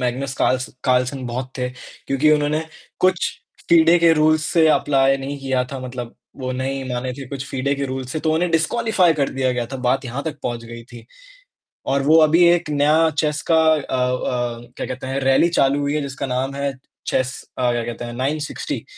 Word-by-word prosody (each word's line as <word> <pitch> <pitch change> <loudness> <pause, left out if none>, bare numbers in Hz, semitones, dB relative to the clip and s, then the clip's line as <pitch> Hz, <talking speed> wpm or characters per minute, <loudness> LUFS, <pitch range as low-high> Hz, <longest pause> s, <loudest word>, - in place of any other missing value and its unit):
मैग्नेस 130 +2 -2
calls 130 0 +1 0.2
Carlsen 130 +1 +1
बहुत 125 +2 -4
थे 125 0 -1 0.4
क्योंकि 140 +3 +2
उन्होंने 150 +1 +1 0.4
कुछ 185 -1 +2 0.4
फ़िडे 170 +1 +6
के 165 0 +5
रूल्स 155 0 +3
से 165 -2 +5
अप्लाई 135 -3 +3
नहीं 140 +1 -5
किया 130 -2 0
था, 135 - -5
मतलब 125 -2 -7 0.2
वो 130 -2 -4
नहीं 135 +1 -3
माने 125 +1 -3
थे 135 +1 -8
कुछ 140 0 -6
फ़िडे 140 +1 -1
के 140 0 -3
रूल्स, 130 +1 -5
तो 155 0 0
उन्हें 175 +2 0
डिसक्वालिफ़ाई 185 +2 +2
कर 140 -3 0
दिया 130 -1 -1
गया 120 -1 -2
था, 135 - -6
बात 125 +1 0
यहाँ 125 +3 -4
तक 160 -3 -4
पहुँच 120 -1 -4
गई 115 0 -9
थी 120 -2 -11 0.9
और 135 0 +1
वो 155 +3 +5
अभी 165 +3 +5
एक 170 -3 +2
नया 150 +3 +3
चेस 150 0 0
का 165 - +5 0.2
अ - - +1
अ, 125 -3 -2 0.2
क्या - - -4
कहते 130 +1 -6
हैं 135 +1 -2
रैली 135 +5 +4
चालू 140 -4 +2
हुई 145 +1 -1
है 150 - 0
जिसका 140 0 -5
नाम 130 +1 -2
है 140 0 -2 0.3
चेस 130 0 -1 0.2
अ, 125 -1 +2
क्या 120 -1 -1
कहते 120 0 -6
हैं 120 - -6
नाइन 135 +6 -1
सिक्स्टी, 150 - -5
135 Hz, 200 wpm, -21 LUFS, 125-155 Hz, 0.9 s, फ़िडे